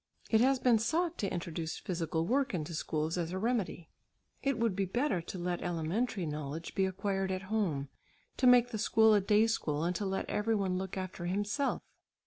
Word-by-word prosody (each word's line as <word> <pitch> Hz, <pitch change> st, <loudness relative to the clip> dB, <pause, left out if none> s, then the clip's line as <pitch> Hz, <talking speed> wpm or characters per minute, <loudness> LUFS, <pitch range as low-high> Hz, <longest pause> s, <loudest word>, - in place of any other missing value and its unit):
It 220 Hz, -1 st, +5 dB
has 265 Hz, +2 st, +4 dB
been 245 Hz, -3 st, +4 dB
sought 325 Hz, +9 st, 0 dB
to 200 Hz, -, -1 dB
introduce 165 Hz, -2 st, -4 dB
physical 165 Hz, -4 st, -2 dB
work 260 Hz, +1 st, +1 dB
into 165 Hz, 0 st, -4 dB
schools 155 Hz, +2 st, -1 dB
as 170 Hz, -1 st, -2 dB
a 185 Hz, -, -2 dB
remedy. 205 Hz, -6 st, -2 dB, 0.5 s
It 275 Hz, -3 st, 0 dB
would 230 Hz, -4 st, +1 dB
be 195 Hz, 0 st, 0 dB
better 220 Hz, -, 0 dB
to 175 Hz, -, -7 dB
let 175 Hz, 0 st, -2 dB
elementary 175 Hz, +5 st, -1 dB
knowledge 150 Hz, +1 st, -5 dB
be 190 Hz, -1 st, +2 dB
acquired 195 Hz, 0 st, -1 dB
at 185 Hz, +1 st, -3 dB
home, 160 Hz, -11 st, 0 dB, 0.5 s
to 255 Hz, -, +3 dB
make 245 Hz, -1 st, +6 dB
the 220 Hz, -, -3 dB
school 220 Hz, 0 st, +5 dB
a 205 Hz, -, +4 dB
day 210 Hz, +3 st, +4 dB
school, 155 Hz, -9 st, -1 dB
and 175 Hz, +2 st, 0 dB
to 205 Hz, -, -3 dB
let 190 Hz, 0 st, -2 dB
every 220 Hz, +2 st, 0 dB
one 190 Hz, -3 st, 0 dB
look 190 Hz, 0 st, -5 dB
after 185 Hz, -2 st, -4 dB
himself. 205 Hz, +9 st, -1 dB
190 Hz, 195 wpm, -32 LUFS, 170-225 Hz, 0.5 s, make